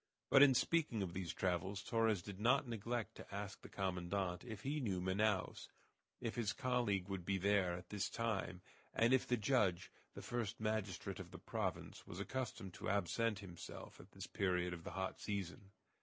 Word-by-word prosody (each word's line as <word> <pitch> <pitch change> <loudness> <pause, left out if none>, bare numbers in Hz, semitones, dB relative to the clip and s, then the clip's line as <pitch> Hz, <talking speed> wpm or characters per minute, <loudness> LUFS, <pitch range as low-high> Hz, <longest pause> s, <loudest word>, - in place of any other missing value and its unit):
But 135 - +9
in 140 -2 +9
speaking 130 -6 +2
of 90 -3 -4
these 90 -3 -2
travels 95 +3 0
Torres 115 -6 +2
did 100 -2 -7
not 125 +5 +4
neglect 115 0 -2
to - - -10
ask 100 -1 -4
the - - -10
commandant 90 -1 -1
if 110 -4 -7
he 145 +3 0
knew 100 -9 0
Manaos, 95 +2 +1 0.5
if 115 - -2
his 115 -4 0
colleague 120 -8 +1
would 95 -2 -3
be 95 +2 +1
there 95 -2 +3
at 90 0 -7
this 105 -1 -1
time, 100 -5 -1 0.3
and 115 +3 +5
if 130 - +4
the 125 - +3
judge, 100 -6 +2 0.2
the - - -7
first 120 -4 -2
magistrate 110 -3 -1
of - - -7
the - - -8
province, - - -3
was 85 - -6
accustomed 110 -4 -3
to - - -4
absent 100 +3 +2
himself 90 -4 -8
at - - -14
this - - -6
period 90 -2 +1
of 85 -1 -7
the - - -6
hot 95 0 -2
season. 100 -1 -3
100 Hz, 185 wpm, -40 LUFS, 95-115 Hz, 0.5 s, But